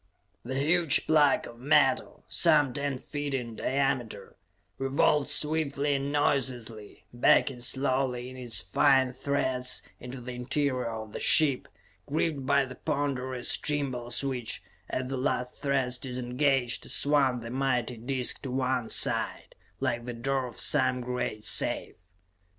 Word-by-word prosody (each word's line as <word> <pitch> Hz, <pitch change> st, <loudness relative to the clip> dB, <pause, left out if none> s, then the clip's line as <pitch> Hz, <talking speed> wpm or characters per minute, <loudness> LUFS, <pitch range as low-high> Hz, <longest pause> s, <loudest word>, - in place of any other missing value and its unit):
The 130 Hz, +3 st, -4 dB
huge 160 Hz, +2 st, +3 dB
plug 150 Hz, -3 st, +4 dB
of 120 Hz, 0 st, -12 dB
metal, 135 Hz, +4 st, +2 dB
some 145 Hz, -4 st, +4 dB
ten 140 Hz, -1 st, -2 dB
feet 145 Hz, +2 st, -4 dB
in 120 Hz, -3 st, -4 dB
diameter, 135 Hz, -3 st, -2 dB, 0.4 s
revolved 135 Hz, +2 st, +2 dB
swiftly 150 Hz, -2 st, +1 dB
and 140 Hz, 0 st, -2 dB
noiselessly, 125 Hz, -7 st, -2 dB
backing 125 Hz, +2 st, +3 dB
slowly 130 Hz, -1 st, 0 dB
in 130 Hz, -, -10 dB
its 125 Hz, -3 st, +1 dB
fine 135 Hz, -3 st, +3 dB
threads 130 Hz, -1 st, -1 dB, 0.2 s
into 125 Hz, +1 st, -8 dB
the 125 Hz, +1 st, -7 dB
interior 130 Hz, 0 st, -1 dB
of 110 Hz, -1 st, -7 dB
the -, -, -5 dB
ship, 145 Hz, -5 st, +3 dB, 0.4 s
gripped 145 Hz, -2 st, -1 dB
by 140 Hz, 0 st, +3 dB
the 130 Hz, -, -9 dB
ponderous 130 Hz, -4 st, -1 dB
gimbals 130 Hz, -4 st, -2 dB
which, 125 Hz, -4 st, -2 dB, 0.3 s
as 130 Hz, 0 st, -2 dB
the 135 Hz, 0 st, -3 dB
last 125 Hz, -1 st, -1 dB
threads 135 Hz, -3 st, 0 dB
disengaged, 125 Hz, 0 st, -1 dB
swung 140 Hz, -4 st, +2 dB
the 115 Hz, 0 st, -7 dB
mighty 125 Hz, -2 st, -1 dB
disc 125 Hz, +2 st, -1 dB
to 135 Hz, -, -5 dB
one 130 Hz, -2 st, -1 dB
side, -, -, -1 dB, 0.3 s
like 120 Hz, -3 st, -1 dB
the 125 Hz, -, -5 dB
door 130 Hz, +2 st, -1 dB
of 120 Hz, -, -9 dB
some 130 Hz, -1 st, +2 dB
great 125 Hz, -3 st, -3 dB
safe. -, -, +1 dB
130 Hz, 135 wpm, -28 LUFS, 125-140 Hz, 0.4 s, plug